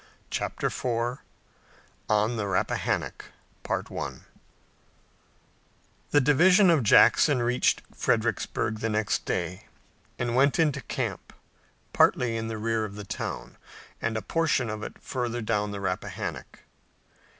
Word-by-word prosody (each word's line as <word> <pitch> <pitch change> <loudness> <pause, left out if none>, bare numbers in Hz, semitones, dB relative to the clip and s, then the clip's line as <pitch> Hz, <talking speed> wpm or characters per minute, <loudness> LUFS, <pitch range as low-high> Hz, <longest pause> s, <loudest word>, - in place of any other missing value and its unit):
CHAPTER - - -3
IV 120 +1 -1 0.9
ON 105 +2 +2
THE 105 -3 -2
RAPPAHANNOCK 95 -2 -1 0.4
The - - -3 2.0
division 175 +7 +5
of 160 -4 +4
Jackson 125 +4 +5
reached 125 +1 +1
Fredericksburg 110 -1 0
the 115 - -1
next 110 -1 0
day - - -3 0.5
and 120 -1 -1
went 140 +2 +4
into 155 -4 +2
camp, - - -4 0.6
partly 120 -2 +3
in 115 0 -3
the 110 -1 -4
rear 115 0 0
of 100 -2 -6
the 105 - -7
town, - - -5 0.4
and 115 -1 -1
a - - -4
portion 155 -8 +1
of 105 0 -5
it - - -8
further 120 -2 -3
down 105 -2 -1
the 100 -1 -5
Rappahannock. 90 -2 -4
115 Hz, 115 wpm, -27 LUFS, 110-130 Hz, 2.0 s, division